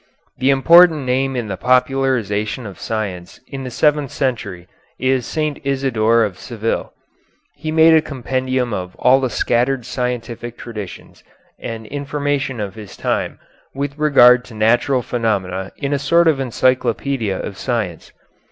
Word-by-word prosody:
The 130 +2 +2
important 160 +2 +6
name 130 +1 0
in 120 -3 -2
the 95 -2 -4
popularization 125 -3 0
of 100 -3 -9
science 100 -6 -5
in 135 -1 -7
the 130 - -5
seventh 150 +1 +1
century 110 -11 -3 0.3
is 130 -2 0
St. 155 -2 -2
Isidore 115 -5 +2
of 100 -4 -3
Seville. 115 -2 -3 0.6
He 155 +2 -5
made 160 +1 +6
a 160 - +6
compendium 130 -3 -2
of 90 -2 -5
all 130 +1 +4
the 130 - 0
scattered 125 +1 0
scientific 120 -1 -4
traditions 105 -6 -9 0.4
and 110 -1 -6
information 140 0 -2
of 100 -3 -4
his 105 -2 -11
time - - -2 0.4
with 140 0 -3
regard 125 -5 +6
to 115 - -12
natural 120 +4 +2
phenomena 95 -6 -2
in 140 -1 -2
a 140 - 0
sort 170 +5 +3
of 155 -4 +3
encyclopedia 125 -3 0
of 100 - -5
science. 110 - -3
125 Hz, 145 wpm, -19 LUFS, 110-135 Hz, 0.6 s, important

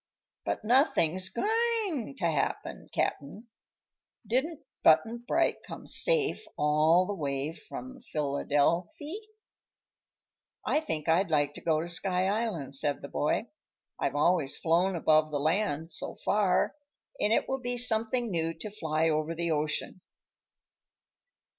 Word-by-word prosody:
But - - -3
nothing's 220 - +3
goin' 430 - -1
to 175 - -2
happen, 155 -4 -2
Cap'n. 145 - -2 0.8
Didn't 280 +7 -1 0.2
Button 225 +9 +4
Bright - - +2
come - - -9
safe 460 -4 +2
all 155 +4 +4
the 205 - -3
way 140 -4 -2
from 260 +9 -9
Philydelfy?" 155 - 0 1.5
"I 300 - +2
think 160 - -4
I'd 170 +4 +3
like 145 -2 +2
to - - -10
go 160 -2 +1
to 170 - -5
Sky 180 +1 0
Island," 200 - -2
said 140 +1 0
the 140 - -7
boy. 185 +9 -1 0.5
"I've - - -1
always 150 -1 +2
flown 175 +3 +2
above 155 -1 +3
the 150 - -2
land, 160 0 0
so - - -3
far, 200 -3 +2 0.5
and 210 - +1
it - - +2
will 265 0 -2
be 245 0 -3
something 235 0 +2
new 165 -1 -1
to 215 - -7
fly 160 -5 0
over 155 +1 0
the 170 0 -1
ocean." 155 +4 -1
175 Hz, 130 wpm, -29 LUFS, 155-235 Hz, 1.5 s, Button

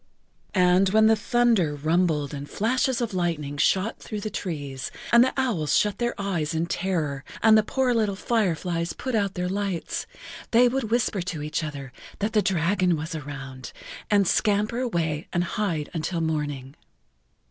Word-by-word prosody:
And 180 +1 +4
when 220 +2 +4
the 220 0 +6
thunder 225 - +2
rumbled 155 -1 +1
and 145 0 -6
flashes 250 +3 0
of 230 -3 -2
lightning 160 -5 -2
shot 190 +8 +1
through 210 -2 -6
the 215 - -5
leaves, 140 -6 -4 0.2
and 235 0 +8
the 260 - +1
owls 215 - +1
shut 210 -1 +1
their 240 -2 -1
eyes 170 -6 -1
in 160 +1 +1
terror 160 -6 -2 0.2
and 220 0 +7
the 215 - +6
poor 255 +3 0
little 215 -4 +1
fireflies 175 -6 -1
put 260 - -5
out 200 -3 0
their 180 -1 -1
lights, 195 -2 -3 0.4
they 245 +2 +5
would 260 0 -1
whisper 225 -4 +1
to 175 -4 -4
each 155 +2 -2
other 140 -4 -6 0.2
that 210 +2 -2
the 215 - +4
dragon 180 -1 +1
was 160 +3 -5
around, 135 -3 -7 0.4
and 200 -3 +3
scamper 210 +5 +1
away 170 -11 -1
and 175 - +1
hide 170 -6 -2
until 165 +1 -2
morning. 145 -4 -3
180 Hz, 165 wpm, -25 LUFS, 155-215 Hz, 0.4 s, and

